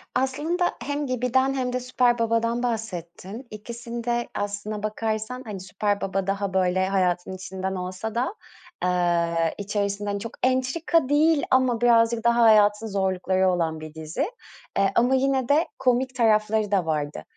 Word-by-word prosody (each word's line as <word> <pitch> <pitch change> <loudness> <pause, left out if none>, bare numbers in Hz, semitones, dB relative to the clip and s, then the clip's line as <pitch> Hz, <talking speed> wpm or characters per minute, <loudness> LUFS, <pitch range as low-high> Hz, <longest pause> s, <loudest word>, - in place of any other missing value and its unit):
Aslında 295 +8 0
hem 290 +1 -2
Gibi'den 255 +2 +1
hem 255 -2 -2
de 255 - 0
Süper 245 -1 +1
Baba'dan 230 +1 +1
bahsettin. 215 0 -5
İkisinde 235 +2 -4
aslına 205 +1 -4
bakarsan 220 +3 -3
hani 205 -3 -6
Süper 205 +2 -2
Baba 195 0 -2
daha 195 -1 -1
böyle 185 0 +2
hayatın 185 -1 0
içinden 190 +1 -5
olsa 185 +5 -5
da, 255 - 0 0.5
eee, 170 -2 +1
içerisinde 205 0 -2
hani 200 0 -2
çok 230 +3 -7
entrika 265 +4 +1
değil 300 +1 +3
ama 255 -3 +3
birazcık 230 -1 +4
daha 235 0 +3
hayatın 215 0 +5
zorlukları 190 -1 +1
olan 165 -3 0
bir 155 -1 -9
dizi. 160 - -3 0.5
Eee, 195 0 +3
ama 245 +3 +4
yine 265 -1 +1
de 310 +4 +3
komik 255 +1 +1
tarafları 215 -3 +2
da 190 -4 +2
vardı. 150 -2 -2
220 Hz, 145 wpm, -25 LUFS, 190-250 Hz, 0.5 s, hayatın